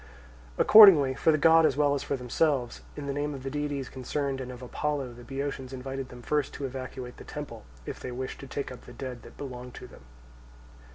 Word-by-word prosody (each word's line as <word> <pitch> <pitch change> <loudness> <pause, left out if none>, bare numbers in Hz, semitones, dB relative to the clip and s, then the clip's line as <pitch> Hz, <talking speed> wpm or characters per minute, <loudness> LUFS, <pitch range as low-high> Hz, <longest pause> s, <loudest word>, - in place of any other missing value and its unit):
Accordingly 180 -11 +9
for 150 +4 +3
the 155 - +3
god 165 +2 +6
as 155 - +2
well 145 -1 +3
as 140 - -1
for 140 - -2
themselves, 125 0 0 0.2
in 145 - -5
the 140 - -2
name 145 +1 -2
of 130 - -9
the 135 - -4
deities 145 -3 -3
concerned, 135 +1 -3
and 125 0 -6
of 125 0 -10
Apollo, 135 0 -3
the 120 +1 -12
Boeotians 135 0 -5
invited 135 0 -5
them 125 -1 -11
first 150 0 -1
to 140 - -4
evacuate 130 -1 -7
the - - -10
temple, - - -8 0.2
if - - -6
they 130 - -6
wished 130 +1 -5
to 135 - -9
take 140 0 -4
up 125 - -11
the - - -10
dead 125 -3 -7
that - - -14
belonged 125 -3 -8
to - - -9
them. - - -15
135 Hz, 220 wpm, -28 LUFS, 125-145 Hz, 0.2 s, Accordingly